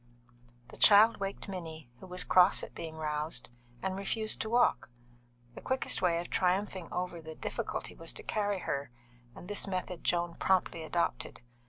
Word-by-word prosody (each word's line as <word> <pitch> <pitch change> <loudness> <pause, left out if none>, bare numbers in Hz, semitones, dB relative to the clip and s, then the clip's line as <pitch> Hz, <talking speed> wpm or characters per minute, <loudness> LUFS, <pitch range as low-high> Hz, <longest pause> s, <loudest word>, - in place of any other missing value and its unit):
The - - -10
child 215 +2 +7
waked 195 +1 -4
Minnie, 160 -8 -7
who 190 - -11
was 180 0 0
cross 185 +1 +5
at - - -8
being 160 -1 -6
roused, 150 0 -2 0.3
and 190 0 -1
refused 215 +3 -1
to 220 - -3
walk. 240 - +3 0.6
The - - -10
quickest 260 -5 0
way 170 -2 +3
of 175 - -5
triumphing 185 -1 0
over 180 -1 -3
the 160 0 -9
difficulty - - -4
was - - -4
to - - -6
carry 205 -3 -1
her, 140 -1 -3 0.5
and 175 - -10
this 205 0 0
method 185 -2 -4
Joan 175 -1 +1
promptly 185 -3 +1
adopted. 160 -6 -2
180 Hz, 165 wpm, -31 LUFS, 165-195 Hz, 0.6 s, child